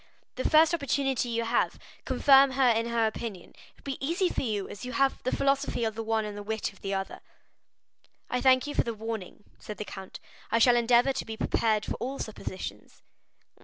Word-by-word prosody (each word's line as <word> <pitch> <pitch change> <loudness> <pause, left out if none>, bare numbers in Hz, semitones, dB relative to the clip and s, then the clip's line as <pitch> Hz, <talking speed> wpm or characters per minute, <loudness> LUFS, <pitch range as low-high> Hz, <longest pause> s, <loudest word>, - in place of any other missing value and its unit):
The 255 - -1
first 315 +2 +5
opportunity 270 -5 0
you 230 0 -1
have, 230 +1 0 0.3
confirm 270 +1 +5
her 260 -1 +3
in 230 0 +1
her 235 -1 +1
opinion; 215 -4 -5
it - - -21
will - - -25
be 270 -1 -5
easy 350 +6 +1
for - - -2
you, 210 -6 -2
as 200 - -9
you 250 0 -5
have 275 -1 +1
the 255 - -2
philosophy 275 -2 0
of 220 -1 0
the 225 - -5
one 220 -1 0
and 210 -1 -6
the 205 - -6
wit 220 0 -3
of 195 - -21
the 195 - -4
other." 195 0 -3 1.1
"I 250 - -1
thank 260 0 +5
you 290 - -4
for - - +2
the 230 -1 -4
warning," 220 -3 -6 0.2
said 210 - -8
the 210 - -5
count; 190 -2 -9 0.3
"I - - +2
shall 240 +1 +5
endeavor 240 +2 +4
to 265 - -3
be 220 0 -7
prepared 215 -1 +1
for - - -4
all 265 +3 -4
suppositions." 185 - -7
235 Hz, 210 wpm, -28 LUFS, 215-270 Hz, 1.1 s, first